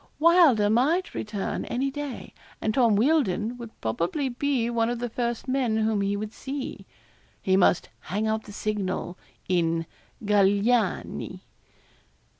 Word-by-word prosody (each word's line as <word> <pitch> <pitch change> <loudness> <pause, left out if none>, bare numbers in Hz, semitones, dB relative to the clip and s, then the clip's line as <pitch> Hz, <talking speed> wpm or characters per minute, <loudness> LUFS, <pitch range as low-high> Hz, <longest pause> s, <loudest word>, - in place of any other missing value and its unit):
Wylder 320 - +5
might 280 - +2
return 210 -2 -3
any 270 +3 -1
day, 290 -2 -6 0.3
and 215 - -1
Tom 235 -4 +4
Wealdon 235 - +2
would 235 -2 -8
probably 170 - -1
be 255 -1 0
one 230 -1 +1
of 240 - -2
the 240 0 -4
first 235 +1 -2
men 255 -4 +1
whom 220 -2 +1
he 200 +1 0
would 215 +1 -5
see. 275 0 -6 0.5
He 190 - +2
must 180 -2 +3 0.2
'hang 210 +4 -1
out 220 0 -1
the 205 - -10
signal' 200 -4 -3 0.3
in 165 -2 +1 0.4
'Galignani.' 205 +3 +1
220 Hz, 135 wpm, -26 LUFS, 205-260 Hz, 0.5 s, Wylder